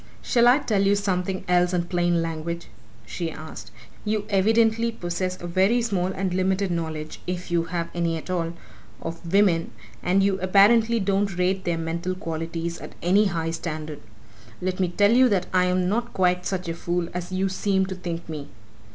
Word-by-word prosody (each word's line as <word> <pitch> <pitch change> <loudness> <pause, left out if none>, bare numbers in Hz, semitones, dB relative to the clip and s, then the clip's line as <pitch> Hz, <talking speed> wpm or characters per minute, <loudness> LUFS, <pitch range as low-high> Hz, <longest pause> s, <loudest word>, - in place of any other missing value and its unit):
"Shall 240 -1 +4
I 250 +2 +7
tell 215 -9 0
you 200 +1 +4
something 190 -2 -1
else 180 0 +3
in 175 - +1
plain 175 -1 +1
language?" 165 +1 -4 0.4
she 170 -2 -4
asked. 155 -8 -9 0.3
"You 210 -1 -1
evidently 225 +3 +3
possess 185 -2 -3
a - - -7
very 190 +7 +3
small 195 -6 0
and 190 -1 -2
limited 190 +1 +1
knowledge 160 -2 -4
if 180 -1 -4
you 170 -1 +2
have 170 0 -3
any 170 -1 0
at 160 - -9
all! 170 -2 -1 0.5
of 165 +1 -6
women, 190 -4 +3 0.3
and 190 +2 +2
you 195 -1 +1
apparently 220 +5 +5
don't 195 -1 0
rate 185 +1 0
their 170 -1 0
mental 170 +3 -3
qualities 165 -1 -4
at - - -10
any 195 +5 +4
high 165 -4 -1
standard. 155 -2 -5 0.6
Let 185 +1 -2
me 185 - +2
tell 205 +4 +3
you 255 +2 +6
that 190 -4 +1
I 180 -1 +4
am 180 0 +1
not 235 +5 -1
quite 180 -1 +1
such 185 -2 -3
a 165 - -1
fool 170 +1 -2
as 180 +1 -5
you 190 +1 0
seem 190 0 +1
to 190 - -5
think 175 -2 -5
me! 150 -3 -6
180 Hz, 185 wpm, -24 LUFS, 170-195 Hz, 0.6 s, I